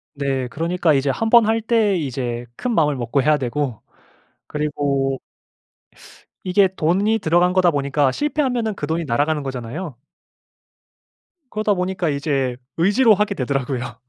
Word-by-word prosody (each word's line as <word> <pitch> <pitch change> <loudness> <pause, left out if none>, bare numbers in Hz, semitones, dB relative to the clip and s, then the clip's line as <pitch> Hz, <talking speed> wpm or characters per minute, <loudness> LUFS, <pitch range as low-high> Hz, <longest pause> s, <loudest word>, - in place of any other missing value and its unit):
네 135 -2 -1
그러니까 165 +4 0
이제 135 0 +1
1 225 +8 -2
번 235 -1 +7
할 225 +1 +1
때 220 -3 +2
이제 125 -6 -3
큰 245 -2 -2
마음을 150 -5 +2
먹고 125 +2 0
해야 150 +2 +3
되고 130 -2 -3 0.7
그리고 140 -3 -1 1.2
이게 190 +1 +3
돈이 195 +8 +1
들어간 175 0 +2
거다 185 -2 +4
보니까 140 -2 +1
실패하면은 255 - -1
그 145 - -4
돈이 165 0 -1
날아가는 145 +4 0
거잖아요. 130 +4 -6 1.5
그러다 215 -1 +1
보니까 180 -2 -1
이제 140 -3 -1 0.2
의지로 205 +7 +4
하게 210 0 0
되더라고요. 130 -3 -3
155 Hz, 305 characters per minute, -21 LUFS, 135-195 Hz, 1.5 s, 번